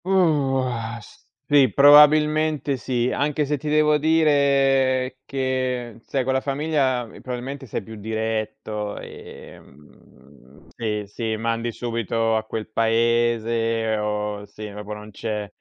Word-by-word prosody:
Mhmm, 190 +1 +1 0.4
o 130 -1 +1
ah, 120 -1 -4 0.5
sì, 140 -5 +5
probabilmente 150 +2 +5
sì. 125 -1 -1
Anche 150 +1 0
se 145 +1 -1
ti 150 - -4
devo 150 0 +3
dire 135 -4 +2
che 130 -3 -2
sai 135 -2 -1
con 130 +1 0
la 130 - +1
famiglia 140 -3 0
probabilmente 130 +4 -7
sei 105 - -4
più 110 - -11
diretto, 110 -1 -4
ehm, 75 0 -15
sì 105 +3 -3
sì, 110 +2 -4
mandi 115 +1 -2
subito 115 -1 -1
a 110 0 -1
quel 110 -1 -5
paese 115 0 +1
o 105 -1 -3
sì, 105 +1 -9
proprio 105 +1 -7
non 105 0 -11
c'è 105 0 -4
120 Hz, 125 wpm, -23 LUFS, 110-140 Hz, 0.5 s, sì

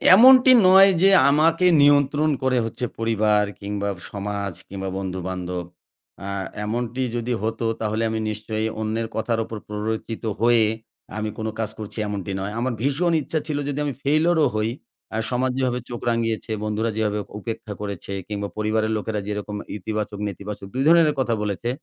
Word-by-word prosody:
এমনটি 255 +4 +8 0.2
নয় 190 +1 +8
যে 195 - +7 0.2
আমাকে 165 +5 +3 0.2
নিয়ন্ত্রণ 145 +1 +4
করে 130 -1 +2
হচ্ছে 115 +2 -3
পরিবার 110 -2 +2 0.2
কিংবা 100 0 -2 0.2
সমাজ 100 -1 -3
কিংবা 95 0 -5
বন্ধু-বান্ধব। 90 -1 -4 0.6
আ - - -5 0.4
এমনটি 120 +3 -2
যদি 120 +1 -1
হতো 115 +1 -2 0.2
তাহলে 110 +1 -1
আমি 110 0 -2
নিশ্চয়ই 110 +1 -3
অন্যের 110 +1 -1
কথার 115 0 0
উপর 110 - -7
প্ররোচিত 110 +2 -4 0.2
হয়ে 115 -1 +5 0.5
আমি 110 0 -2
কোনো 110 0 -3
কাজ 110 -2 -1
করছি 105 +1 -7
এমনটি 100 -2 -4
নয়। 100 +2 -4
আমার 125 +1 -1
ভীষণ 145 +7 +1
ইচ্ছা 155 +3 -2
ছিল 150 -2 -1
যদি 145 0 -2
আমি 145 - -2
ফেইলিউর 155 +4 +3
ও - - +4
হই 110 +1 0 0.5
আ - - 0
সমাজ 130 +1 +1
যেভাবে 125 -2 0
চোখ 120 -1 -5
রাঙিয়েছে, 115 -1 -1
বন্ধুরা 105 +2 -1
যেভাবে 105 -1 0 0.2
উপেক্ষা 115 0 -6
করেছে 100 -2 -5 0.2
কিংবা 100 -1 -3
পরিবারের 110 +1 0
লোকেরা 105 0 -3
যেরকম 105 0 -4 0.2
ইতিবাচক-নেতিবাচক 105 -1 -5
২ 130 - 0
ধরনের 165 -2 +5
কথা 120 -3 +1
বলেছে, 105 +3 -2
110 Hz, 155 wpm, -23 LUFS, 105-130 Hz, 0.6 s, এমনটি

